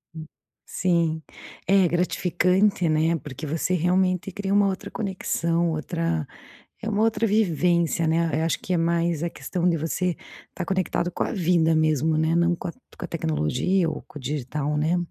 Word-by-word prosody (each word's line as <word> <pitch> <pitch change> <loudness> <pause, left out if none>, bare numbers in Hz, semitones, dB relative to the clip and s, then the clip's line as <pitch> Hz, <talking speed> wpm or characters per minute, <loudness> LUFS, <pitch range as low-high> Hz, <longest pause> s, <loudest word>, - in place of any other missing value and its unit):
Hum. 160 0 -7 0.4
Sim. 170 -3 0 0.4
É, 195 0 +5
é - - +3
gratificante, 180 +1 +1
né, 160 +2 +2
porque 145 +1 -7
você 165 +4 -1
realmente 185 +2 +1
cria 195 0 -3
uma 200 0 +4
outra 200 +1 -4
conexão, 170 -5 -1
outra 165 0 -2 0.6
é 220 - -3
uma 210 +1 +1
outra 225 0 +2
vivência, 170 -5 +2
né, 160 -2 +1
eu - - +1
acho 165 - 0
que 185 - -4
é - - +3
mais 170 -1 +1
a 170 - -1
questão 180 -1 -2
de 170 - +2
você 165 +3 -1 0.3
estar 180 - -5
conectado 185 -2 -1
com - - -2
a - - -3
vida 170 -4 +2
mesmo, 155 0 +2
né, 160 +1 +2
não 170 0 +3
com - - -6
a - - -5
com 255 - -13
a - - -4
tecnologia 165 - 0
ou 150 - -6
com 150 - -12
o - - -10
digital, 145 +2 -2
né. 160 +4 +1
170 Hz, 185 wpm, -24 LUFS, 160-185 Hz, 0.6 s, É